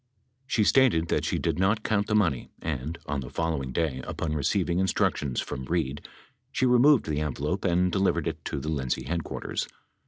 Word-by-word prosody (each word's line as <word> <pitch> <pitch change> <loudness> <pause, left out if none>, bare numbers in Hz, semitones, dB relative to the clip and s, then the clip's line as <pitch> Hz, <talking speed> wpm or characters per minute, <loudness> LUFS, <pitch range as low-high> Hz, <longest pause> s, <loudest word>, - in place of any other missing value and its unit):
She 110 - +2
stated 100 -10 +4
that - - +1
she - - 0
did - - -1
not 105 +3 +2
count 105 -2 +1
the 105 - +1
money 85 - +1
and, 75 +1 -3
on 70 -1 -2
the 65 -2 -6
following 75 -3 -2
day, 70 -3 -1
upon 80 -1 -3
receiving 85 +4 +1
instructions 75 -7 0
from 65 - -4
Reid, 75 -3 -2 0.4
she 130 - +1
removed 125 +1 +5
the 75 -1 -1
envelope 75 +5 -2
and 90 0 +2
delivered 85 -3 +1
it 80 -1 -4
to 75 - -3
the 75 - -4
Lindsay 65 -5 -1
headquarters. 85 +3 -3
80 Hz, 180 wpm, -27 LUFS, 75-95 Hz, 0.4 s, removed